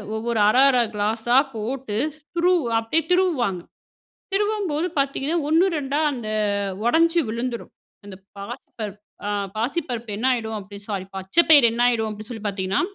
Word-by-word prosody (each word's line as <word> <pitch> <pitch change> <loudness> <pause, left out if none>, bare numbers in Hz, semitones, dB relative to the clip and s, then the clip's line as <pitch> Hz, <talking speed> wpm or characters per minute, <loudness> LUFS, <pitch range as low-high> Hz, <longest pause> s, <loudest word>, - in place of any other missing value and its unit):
ஒவ்வொரு 230 0 -1
அரை 255 +4 +4
அரை 250 -2 +3
கிளாசா 220 +4 +1 0.2
போட்டு 225 0 -4 0.4
திருவ 355 +1 +3 0.2
அப்படியே 285 +8 0
திருவுவாங்க. 270 - +1 0.7
திருவம்போது 395 -6 0
பார்த்தீங்கன்னா, 275 +3 0
ஓண்ணு 330 +5 +4
2 285 0 -2
அந்த 235 -4 -6 0.6
உடைஞ்சு 330 +6 +3
விழுந்துடும். 235 +1 -4 0.3
அந்த 195 -2 -9 0.2
பாசிப்பருப் 210 -1 -7 0.3
அ - - -1 0.3
பாசிப்பருப்பு 240 -2 -2
என்னாயிடும், 230 -2 0
அப்படி 200 +1 -11
சாரி 195 -3 -3
பச்சை 190 - +3
பயிர் 290 -6 +8
என்னாயிடும் 235 -2 +2
அப்படின்னு 215 +2 -8
சொல்லி 220 -3 -7
பார்த்தீங்கன்னா, 195 -1 -1
240 Hz, 130 wpm, -23 LUFS, 215-295 Hz, 0.7 s, பயிர்